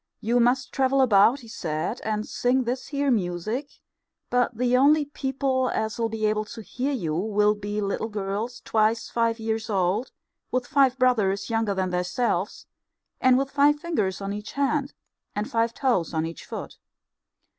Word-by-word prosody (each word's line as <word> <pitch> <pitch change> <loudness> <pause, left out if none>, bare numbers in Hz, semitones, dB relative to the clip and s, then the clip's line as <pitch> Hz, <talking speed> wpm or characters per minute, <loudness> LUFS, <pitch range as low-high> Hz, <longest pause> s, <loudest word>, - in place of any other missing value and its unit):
You 235 +3 +1
must 250 +1 +2
travel 270 0 +2
about, 240 +1 +5
he 230 - -13
said, 165 +1 -3
and 215 0 -2
sing 255 +1 +1
this 250 +2 -3
here 280 -1 0
music, 215 - -1 0.6
but 245 -2 +1
the 250 +1 +2
only 290 +3 +5
people 265 -2 -1
as'll 220 +1 -1
be 220 -1 -2
able 215 0 +1
to 225 +1 -9
hear 255 +6 -3
you 175 - -2
will 210 +3 +2
be 205 0 -4
little 200 +2 -2
girls 210 +3 -4
twice 220 +1 +1
five 230 -1 +1
years 220 +1 -2
old, 195 +4 0 0.4
with 255 -1 -1
five 270 -2 +3
brothers 210 -5 +1
younger 225 -3 0
than 185 -1 -1
theirselves, 180 +2 -1 0.5
and 255 -1 +5
with 275 +1 -1
five 290 +1 +4
fingers 210 - -1
on 195 0 -3
each 210 0 -7
hand, 280 0 0 0.4
and 210 +1 -3
five 230 0 +1
toes 230 - 0
on 160 0 +1
each 165 -1 -7
foot. - - -7
230 Hz, 165 wpm, -25 LUFS, 205-260 Hz, 0.6 s, about